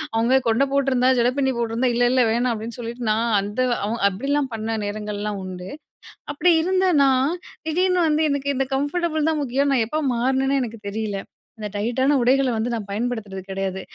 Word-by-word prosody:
அவுங்க 235 +4 +3
கொண்ட 225 +5 +3
போட்டிருந்தா, 260 -2 +3
ஜட 240 +1 +3
பிண்ணி 265 -1 +1
போட்டிருந்தா, 235 +2 0
"இல்ல, 245 - +2
இல்ல 255 -1 +4
வேணாம்." 240 +2 +1
அப்படின்னு 225 +2 -7
சொல்லிட்டு 235 0 -4
நான் 225 +2 +1
அந்த 205 +5 -3 0.2
அவு 225 +3 -2
அப்பிடிலாம் 275 +7 -1
பண்ண 225 0 -3
நேரங்கள்லாம் 210 0 -4
உண்டு. 185 0 -7 0.6
அப்படி 335 +5 +3
இருந்த 375 +1 +2 0.2
நான், 270 +3 +3 0.3
திடீர்னு 365 +3 +2
வந்து 305 +1 +2
எனக்கு 280 0 -1
இந்த 270 0 0
கம்ஃபர்டபுள் 315 +2 0
தான் 305 - -1
முக்கியம்ன்னு, 275 +2 +1
நான் 230 -3 +2
எப்ப 310 +3 -1
மாறுனேனே 265 +3 +1
எனக்கு 230 -2 -7
தெரியல. 205 -1 -3 0.4
அந்த 210 - -4
டைட்டான 260 +7 +1
உடைகள 260 +2 +3
வந்து 225 +3 -1
நான் 225 -3 -3
பயன்படுத்துறது 210 -3 -3
கிடையாது. 190 0 -3
245 Hz, 170 wpm, -22 LUFS, 220-275 Hz, 0.6 s, இல்ல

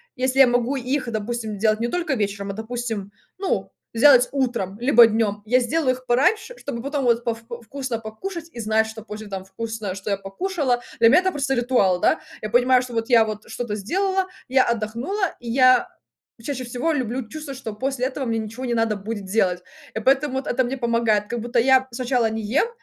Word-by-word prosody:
если 260 +1 0
я 270 - +9
могу 245 +2 +1
их, 260 0 -2
допустим, 220 -1 -3
делать 215 0 +2
не 235 - 0
только 335 -2 -1
вечером, 200 -2 -2
а - - -6
допустим, 220 -2 -4 0.3
ну, 385 0 -2 0.2
сделать 255 0 +6
утром, 235 -8 -1
либо 240 -2 +7
днем, 210 -2 0
я 250 +4 +4
сделаю 260 +1 +1
их 255 - -15
пораньше 430 - +1
чтобы 235 0 -5
потом 280 -1 -2
вот 235 0 +2
повку 235 0 -5
вкусно 260 0 -4
покушать 325 - -7
и 235 - -9
знать, 220 0 +2
что 220 0 -8
позже 215 -1 -8
там 190 -1 -6
вкусно, 215 -1 -5
что 195 +2 -5
я 200 - +1
покушала. 250 - -1 0.2
Для 230 0 +7
меня 300 - +7
это 375 0 0
просто 270 -3 -1
ритуал, 240 -7 +2
да. - - +2 0.2
Я 215 - -4
понимаю 250 +1 +4
что 250 -1 -8
вот 225 +2 -2
я 230 -2 +6
вот 215 -1 -6
что-то 225 -1 -4
сделала, 380 - 0 0.2
я 260 0 +4
отдохнула, 235 - -2
и 240 - -8
я 255 0 +5 0.6
чаще 260 -1 -4
всего 245 +7 -1
люблю 255 -3 -2
чувствовать, 295 -4 -7
что 220 -5 -6
после 260 +2 -2
этого 265 0 -3
мне 230 -1 -1
ничего 225 +4 -6
не 240 - -1
надо 225 -2 +1
будет 205 0 -5
делать, 190 -3 +1 0.3
и - - -1
поэтому 270 +3 +2
вот 265 - -3
это 260 +1 +1
мне 255 +3 -3
помогает 230 -4 +1
как 240 - -3
будто 240 +1 -2
я 260 +1 +4
сначала 245 -1 0
не 220 0 -4
ем, 250 - +1
240 Hz, 205 wpm, -23 LUFS, 220-265 Hz, 0.6 s, я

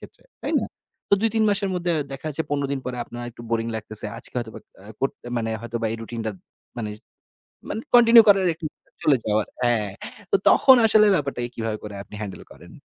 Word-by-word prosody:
ক্ষেত্রে। - - -14 0.2
তাই - - -1
না?" - - -3 0.5
তো - - +10
২ 225 - +3
৩ 220 - +3
মাসের 200 -1 +1
মধ্যে 175 -1 0 0.2
দেখা 135 +3 -7
যাচ্ছে 155 +2 -3
১৫ 140 -1 0
দিন 140 - -2
পরে 125 -1 -3
আপনার 120 0 -8
একটু 120 0 -13
বোরিং 115 0 0
লাগতেছে। 110 0 -3
আজকে - - -10
হয়তোবা 115 -2 -6 0.3
আ - - -14
কর 135 - +1 0.3
মানে 115 -1 -1
হয়তোবা 115 0 -3
এই - - -3
রুটিনটা 115 -1 -4 0.5
মানে 110 -3 -3
জ - - -16 0.7
মানে 220 - -3
কন্টিনিউ 235 -1 +9
করার 195 -2 +5
একটা 160 0 -9 0.4
চলে 140 -4 +4
যাওয়ার 105 0 +1 0.2
হ্যাঁ। 120 -4 +1 0.4
তো - - +4
তখন 265 - +7
আসলে 215 -1 +6
ব্যাপারটাকে 140 -5 -2
কীভাবে 110 -1 -3
করে 105 -1 -7
আপনি 105 - -12
হ্যান্ডেল 100 -3 -6
করেন? - - -14
120 Hz, 200 wpm, -23 LUFS, 115-175 Hz, 0.7 s, তো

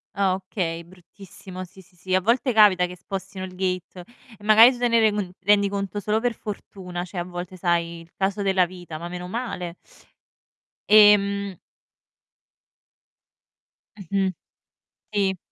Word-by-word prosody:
Ah, 195 -2 +2
okay. 180 -3 -4
Bruttissimo, 185 +1 -12
sì, 190 +1 -14
sì, 185 -1 -25
sì. 185 +1 -5
A 185 - +4
volte 240 +4 +1
capita 200 -4 +6
che 180 0 -8
spostino 190 +1 -6
il 185 -1 -11
gate 180 -1 -3 0.3
e 205 - -19
magari 220 +4 +8
tu 245 - -7
te 245 0 +1
ne 230 -1 +3
rend 215 -1 +3
uhm, 185 -3 -3
rendi 200 +1 +3
conto 200 +1 -3
solo 210 +2 0
per 240 -1 -1
fortuna, 185 -4 -7
cioè 185 +1 -10
a 175 - -1
volte 180 +1 -7
sai, 170 -1 -1
il 165 - -18
caso 195 +1 -1
della 190 -2 +3
vita, 175 -3 -9
ma 170 - -6
meno 180 0 -6
male. 180 -6 -5 1.1
Ehm 200 -2 +5 2.4
Mh 195 -3 -11 0.2
mh, - - -1 0.8
sì. 195 -2 +1
190 Hz, 155 wpm, -24 LUFS, 180-205 Hz, 2.4 s, magari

